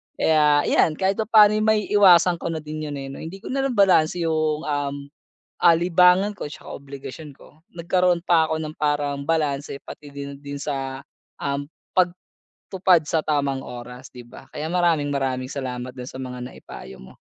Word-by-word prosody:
Kaya 150 -2 +3
yan, 155 - +3
kahit 190 +3 0
papaano 215 -1 +5
maiiwasan 200 -5 +4
ko - - -4
na 160 - -3
din 155 0 -6
yun, 145 - -5
eh, 135 - -6
no? - - -9
Hindi 180 +5 -8
ko - - -8
na 275 - -1
lang 255 -3 -2
balanse 180 -4 +3
yung, 155 -1 0
um, 145 -2 -2 0.7
ah, 170 - +8
libangan 180 +4 +3
ko - - -6
tsaka - - -9
obligasyon 140 +2 -10
ko. 155 +4 -20
Nagkaroon 175 +1 +1
pa 165 -2 +4
ako 160 0 -1
ng 155 0 -6
parang 145 -1 -1
balanse 145 -3 -1
pati 145 -1 -11
din, 140 0 -7
din 140 0 -7
sa, 135 -2 -4 0.4
um, 140 0 -2 0.8
pagtupad 185 -4 +1
sa 160 +1 0
tamang 140 -3 -1
oras, 125 +1 -9
di 125 -1 -12
ba? 120 +2 -14
Kaya 155 +2 -5
maraming-maraming 145 -7 0
salamat 125 -2 -5
dun 125 0 -8
sa - - -10
mga 125 -1 -7
naipayo 65 - -11
mo. 65 - -13
150 Hz, 170 wpm, -23 LUFS, 140-175 Hz, 0.8 s, ah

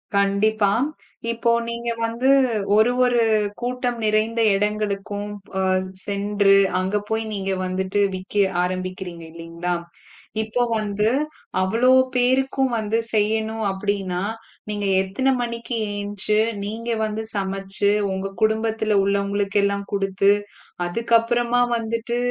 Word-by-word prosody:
கண்டிப்பா. 200 +1 +2 0.6
இப்போ 235 0 +1 0.2
நீங்க 235 0 -3 0.2
வந்து 235 +3 0 0.5
ஒரு 220 +3 +5
ஒரு 245 -1 +3 0.4
கூட்டம் 245 0 -2
நிறைந்த 215 +2 +1
இடங்களுக்கும் 205 0 -2 0.2
போ 190 0 -2 0.4
சென்று 200 0 +2 0.2
அங்க 190 +3 0
போய் 220 0 0
நீங்க 195 -1 -2
வந்துட்டு 190 +2 -1 0.2
விக்க 185 +2 -9 0.3
ஆரம்பிக்கறீங்க 185 -1 -4
இல்லீங்களா, 170 +1 -4 0.7
இப்போ 220 +3 0
வந்து 210 0 0 0.5
அவ்வளவு 250 +7 +4 0.2
பேருக்கும் 260 +1 +2
வந்து 220 0 0 0.2
செய்யணும் 220 +1 0
அப்படின்னா 190 -2 -2 0.5
நீங்க 205 -1 -2 0.2
எத்தனை 230 +8 0
மணிக்கு 235 0 -3 0.2
எந்துச்சு, 205 +1 -1 0.3
நீங்க 225 +3 -5 0.2
வந்து 215 +1 -3
சமைச்சு 195 0 -1 0.2
உங்க 190 +1 -3
குடும்பத்துல 220 -1 +1
உள்ளவங்களுக்கெல்லாம் 200 0 0
குடுத்து 195 0 +2 0.5
அதுக்கப்புறமா 235 +4 +2
வந்துட்டு 230 +1 -2
210 Hz, 100 wpm, -22 LUFS, 195-230 Hz, 0.7 s, ஒரு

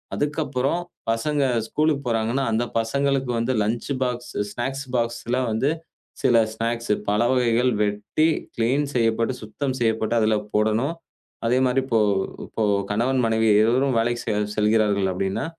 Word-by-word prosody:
அதுக்கப்புறம் 145 +1 -1 0.3
பசங்க 140 +5 0 0.2
ஸ்கூலுக்கு 150 -2 0
போறாங்கன்னா 115 +4 0
அந்தப் 120 +2 -2
பசங்களுக்கு 135 +2 0
வந்து 125 +3 0
லஞ்ச் 115 +6 -2
பாக்ஸ் 125 0 -4 0.2
ஸ்நாக்ஸ் 135 +4 -3
பாக்ஸ்ல 120 +1 -1
வந்து 120 +6 +1 0.5
சில 120 -3 +5 0.2
பாக்ஸ், 115 -1 -1 0.2
பழ 105 +2 +2
வகைகள் 125 0 +2
வெட்டி, 105 +10 0 0.3
கிளீன் 130 +6 +2
செய்யப்பட்டு, 115 +1 +1
சுத்தம் 130 +4 -3
செய்யப்பட்டு 110 0 +1
அதில் 110 0 +2 0.2
போடணும். 110 +8 +1 0.5
அதே 125 +2 +2
மாதிரி 130 +1 +2
இப்போ 115 -4 +1 0.5
இப்போ 115 - -5 0.3
கணவன் 125 +5 +1
மனைவி 110 0 +2
இருவரும் 125 +3 +2
வேலைக்கு 120 +1 0
செ 110 - 0 0.2
செல்கிறார்கள் 105 -2 +2
அப்படின்னா, 95 - -2
120 Hz, 130 wpm, -23 LUFS, 110-135 Hz, 0.5 s, சில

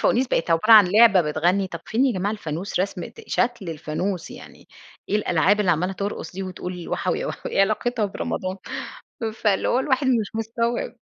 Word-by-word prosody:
الفوانيس 255 +2 +2
بقِت 165 - 0
عبارة 165 +8 +4
عن 210 -4 +9
لعبة 215 -4 +7
بتغنّي، 175 +5 +1
طَب 170 -2 -7
فين 250 +5 +2
يا 255 - +2
جماعة 195 +2 -1
الفانوس، 180 -1 -4
رسمة 185 -3 -3
شكْل 235 -7 -1
الفانوس، 160 +4 -4
يعني - - -13 0.4
إيه 210 - +2
الألعاب 200 +1 +2
اللي 185 -4 +2
عمَّالة 180 +4 0
ترقُص 200 +2 -5
دي 195 +1 -5
وتقول 180 -1 -6
وحَوي - - -1
يا - - -3
وحَوي، - - -6
إيه - - +2
علاقتها 215 +3 +1
برمضان؟ 190 -1 -3 0.8
فاللي 210 -3 0
هو 250 - +2
الواحد 265 0 +1
مش 225 -4 0
مستوعِب. 230 +2 -2
200 Hz, 180 wpm, -23 LUFS, 180-225 Hz, 0.8 s, عن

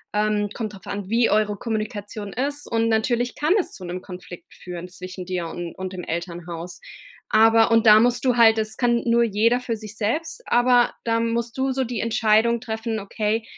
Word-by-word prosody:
Ähm, 210 0 +1
kommt 215 -3 -5
drauf 195 - -13
an, 200 -1 -5
wie 230 +1 +3
eure 210 -1 +2
Kommunikation 210 -2 -4
ist 285 +3 -3
und 230 0 +2
natürlich 235 +2 +1
kann 305 +4 +2
es 370 - -2
zu 190 - -10
'nem 180 +1 -5
Konflikt 180 -2 -11
führen 180 -1 -8
zwischen 185 0 -8
dir 180 -2 -3
und 170 +1 -6
und 185 0 -5
dem 180 -1 -6
Elternhaus. 170 0 -6 0.5
Aber 225 +1 +5
und 230 0 +4
da 215 0 +9
musst 245 +2 +2
du 250 -2 +3
halt 225 -1 +6
das 215 0 -3
kann 240 -2 +2
nur 235 0 +3
jeder 230 +2 +2
für 250 -2 -3
sich 215 0 -9
selbst, 320 - -2
aber 245 0 +4
da 230 0 +1
musst 230 +1 -2
du 265 0 0
so 265 0 0
die 240 -2 -4
Entscheidung 225 +1 +2
treffen: 225 -1 -3
„Okay, 215 +2 -2
220 Hz, 195 wpm, -23 LUFS, 200-235 Hz, 0.5 s, da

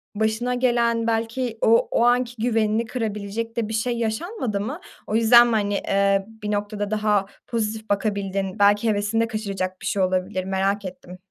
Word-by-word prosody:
başına 220 +3 0
gelen, 235 -2 +1
belki 230 +1 -1
o 230 +1 +4
o 235 - +2
anki 245 0 +2
güvenini 225 -1 +1
kırabilecek 220 -1 -4
de 220 -2 -1
bir 220 - -4
şey 235 +2 -1
yaşanmadı 230 - -2
mı? 275 - -4 0.3
O 215 - -2
yüzden 235 +1 +7
mi, 235 - 0
hani, 205 -1 0
eee, 195 0 +2 0.2
bir 210 - -2
noktada 205 0 -2
daha 210 -2 +1 0.2
pozitif 220 -1 -3
bakabildin, 200 -1 -1
belki 205 +2 +4
hevesini 210 +2 +1
de 230 - +1
kaçıracak 195 -4 -4
bir - - -8
şey 200 - 0
olabilir, 185 +1 0
merak 195 +1 -1
ettim. 180 0 -9
215 Hz, 170 wpm, -23 LUFS, 200-230 Hz, 0.3 s, yüzden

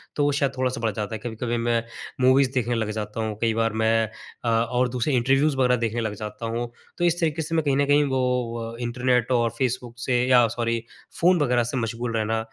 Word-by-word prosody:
तो 145 - +1
वो 145 - +3
शायद 140 -1 +1
थोड़ा-सा 130 -2 -1
बढ़ 115 - +1
जाता 105 +2 -4
है। - - -6
कभी-कभी 120 0 -3
मैं 115 0 +1 0.4
मूवीज़ 130 +1 +4
देखने 120 -2 0
लग 110 -2 -1
जाता 105 0 -5
हूँ, 110 -1 -3
कई 115 -1 +2
बार 115 -1 0
मैं 110 0 +2 0.4
अ, - - -1
और 120 +2 +1
दूसरे 125 +4 -1
इंटरव्यूज़ 135 +4 +2
वरग़ैह 125 -2 +3
देखने 115 0 -1
लग 110 -2 -2
जाता 105 +2 -6
हूँ। 120 0 -3 0.3
तो 175 - +1
इस 175 0 +2
तरीके 160 -1 0
से 160 +1 -3
मैं 160 - +2
कहीं 140 -1 +2
न 145 - +3
कहीं 145 +1 +4
वो 125 -3 -1
अ, - - -9
इंटरनेट 125 0 0
और 120 -2 +3
फेसबुक 125 -2 -2
से 125 0 +1
या 125 -2 +6
सॉरी 115 -1 -1 0.4
फ़ोन 175 +1 +5
वरग़ैह 125 -4 +2
से 120 +3 -3
मशगूल 115 0 -2
रहना 110 +1 0
120 Hz, 225 wpm, -24 LUFS, 115-130 Hz, 0.4 s, या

